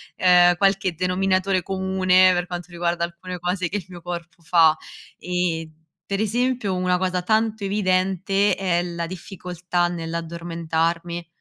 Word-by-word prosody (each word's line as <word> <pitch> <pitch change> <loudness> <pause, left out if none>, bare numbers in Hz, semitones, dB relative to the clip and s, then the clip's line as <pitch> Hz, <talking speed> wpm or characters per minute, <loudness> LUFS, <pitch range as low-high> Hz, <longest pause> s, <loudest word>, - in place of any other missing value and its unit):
ehm, 180 -1 +5
qualche 195 -2 +2
denominatore 185 +1 +1
comune 190 +2 -4 0.5
per 175 0 -1
quanto 175 -1 -6
riguarda 170 0 -1
alcune 175 +1 -6
cose 180 0 -1
che 190 - -6
il 195 -5 -3
mio 175 -1 -10
corpo 175 0 -7
fa 165 -1 +5 0.4
e 180 -3 -2 0.4
pre 195 +1 -2
esempio 235 -2 0
una 180 0 +1
cosa 185 0 -1
tanto 220 +1 +1
evidente 195 0 +1
è 180 -3 0
la 170 -1 -4
difficoltà 180 0 -3
nell'addormentarmi. 170 0 -3
180 Hz, 130 wpm, -23 LUFS, 170-190 Hz, 0.5 s, ehm